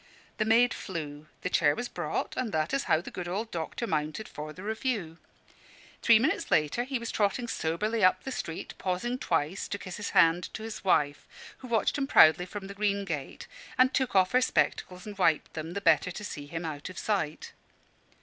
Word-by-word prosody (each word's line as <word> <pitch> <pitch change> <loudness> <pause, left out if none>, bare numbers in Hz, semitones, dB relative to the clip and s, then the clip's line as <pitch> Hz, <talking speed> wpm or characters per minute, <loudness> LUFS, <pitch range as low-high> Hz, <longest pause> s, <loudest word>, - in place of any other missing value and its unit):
The 215 - +2
maid 235 +3 +4
flew; 155 -5 -6 0.2
the - - 0
chair 145 -1 +4
was 245 - -3
brought; - - -3
and 250 -4 -2
that 155 +4 -1
is 275 - 0
how 155 - +3
the - - -9
good 180 -1 -5
old 210 +6 -3
doctor 165 +7 -3
mounted 155 +3 -2
for 150 +1 -7
the 185 +5 -10
review. 215 -6 -2 0.8
Three 230 -2 +7
minutes 235 - 0
later 155 +11 +2
he 265 0 -2
was 235 -1 -5
trotting 215 +3 0
soberly 210 +4 -1
up 185 - +4
the 265 - -5
street, 165 -9 -5
pausing 195 +7 -2
twice 155 - -1
to 200 - -3
kiss 185 -2 -7
his 210 - -4
hand 165 +2 +4
to 220 - -6
his 220 -1 -6
wife, 145 -6 +1 0.3
who 255 - -9
watched 230 +4 +1
him 270 - 0
proudly 170 - +6
from 200 +1 -7
the 200 - -7
green 200 -1 0
gate, 150 -7 -5 0.3
and 255 +1 +5
took 260 -5 0
off 185 -1 +4
her 255 - +4
spectacles 180 -7 0
and 205 -2 -8
wiped 165 -4 +2
them, 160 +1 -5
the 200 - -3
better 165 -2 +4
to 195 +4 -7
see 145 -8 -6
him 165 +2 -5
out 150 +1 -5
of 185 - -10
sight. 175 -8 -2
190 Hz, 205 wpm, -29 LUFS, 160-225 Hz, 0.8 s, Three